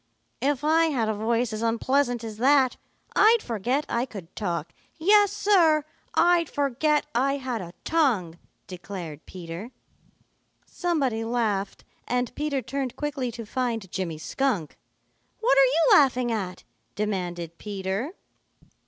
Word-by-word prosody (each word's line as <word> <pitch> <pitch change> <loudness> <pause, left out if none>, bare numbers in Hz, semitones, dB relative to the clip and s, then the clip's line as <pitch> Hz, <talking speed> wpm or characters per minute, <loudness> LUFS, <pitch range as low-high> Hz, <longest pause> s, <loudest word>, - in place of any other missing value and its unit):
"If 280 +1 0
I 320 +2 +4
had 250 -9 0
a - - +1
voice 230 +2 0
as 215 - -4
unpleasant 240 +2 +1
as 220 -2 -6
that, 265 +1 +4 0.4
I'd 450 +1 +5
forget 245 +6 -1
I 235 +2 -1
could 185 -7 -10
talk. 170 -5 -3 0.2
Yes, 405 +4 +5
Sir, 335 -8 +4 0.3
I'd 345 -2 +4
forget 290 +2 +1
I 275 +3 +1
had 255 -5 -3
a 170 -1 -8
tongue," 225 - +1 0.3
declared 175 -4 -8
Peter. 175 +4 -7 1.0
Somebody 275 -11 -1
laughed, 220 -4 -1 0.2
and 245 0 -1
Peter 290 -3 -2
turned 270 0 -3
quickly 275 -3 -3
to 230 0 -7
find 225 -5 -2
Jimmy 175 -5 -3
Skunk. 200 - -1 0.6
"What 445 -10 +3
are 270 - +8
you 305 +5 +4
laughing 255 -4 +2
at?" 190 -5 -3 0.3
demanded 175 -5 -3
Peter. 200 - -3
240 Hz, 130 wpm, -26 LUFS, 200-285 Hz, 1.0 s, are